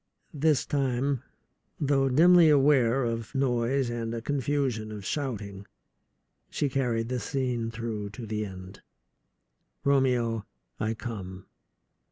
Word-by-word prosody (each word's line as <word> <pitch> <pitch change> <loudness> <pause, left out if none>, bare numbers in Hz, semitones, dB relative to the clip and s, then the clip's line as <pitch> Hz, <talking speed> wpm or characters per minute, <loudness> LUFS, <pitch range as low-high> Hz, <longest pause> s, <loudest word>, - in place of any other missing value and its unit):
This 150 -3 +2
time, 135 -1 0 0.6
though 135 -2 +2
dimly 170 +4 +6
aware 135 -3 +4
of 115 +1 -3
noise 130 -1 +1
and 115 -1 -3
a 115 - -4
confusion 135 -5 -1
of 105 -3 -7
shouting, 105 -9 -4 0.8
she 145 - -1
carried 120 -4 0
the 125 0 -2
scene 125 -4 -2
through 110 -2 -4
to 120 - -6
the 110 0 -2
end. 95 -1 -9 1.0
"Romeo, 125 -6 +1 0.3
I 110 +1 -1
come! 95 -5 -7
120 Hz, 115 wpm, -28 LUFS, 110-135 Hz, 1.0 s, dimly